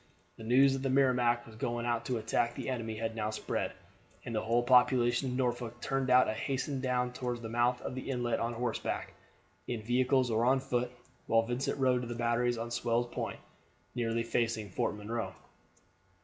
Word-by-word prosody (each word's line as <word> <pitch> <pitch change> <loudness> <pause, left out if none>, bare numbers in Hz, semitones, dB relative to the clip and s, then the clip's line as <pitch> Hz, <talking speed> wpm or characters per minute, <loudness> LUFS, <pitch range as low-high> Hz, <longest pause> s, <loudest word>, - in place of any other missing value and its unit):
The - - -9
news 130 +4 +5
that 135 - -2
the 135 - -1
Merrimac 125 -3 +3
was 110 - -13
going 120 +2 -2
out 120 -1 0
to 125 - -1
attack 115 +2 0
the - - -4
enemy 115 -3 -3
had 115 0 -3
now 110 -1 -1
spread, 110 - -2 0.5
and 120 - -5
the 110 - 0
whole 115 +2 +1
population 125 +1 +4
of 125 - -2
Norfolk 120 -2 -2
turned 135 +1 -1
out 125 0 +6
and 110 - -1
hastened 135 +4 -2
down 125 -1 0
toward 125 -2 -3
the 115 - -5
mouth 120 +2 +2
of - - -4
the 130 +1 -6
inlet 120 -3 0
on 115 +1 -1
horseback, 120 0 -3 0.5
in 115 -3 -3
vehicles, 125 +1 +2
or 110 +1 +2
on 130 +2 +4
foot, 125 -2 -1 0.4
while 115 0 +4
Vincent 120 +4 -2
rode 130 -2 +3
to 120 - -5
the 120 - -4
batteries 120 +1 +1
on 115 +1 -4
Sewell's 120 0 0
Point, - - -3 0.5
nearly 115 -1 0
facing 115 -3 -1
Fort 100 - -1
Monroe. 110 +3 -4
120 Hz, 190 wpm, -32 LUFS, 115-125 Hz, 0.5 s, out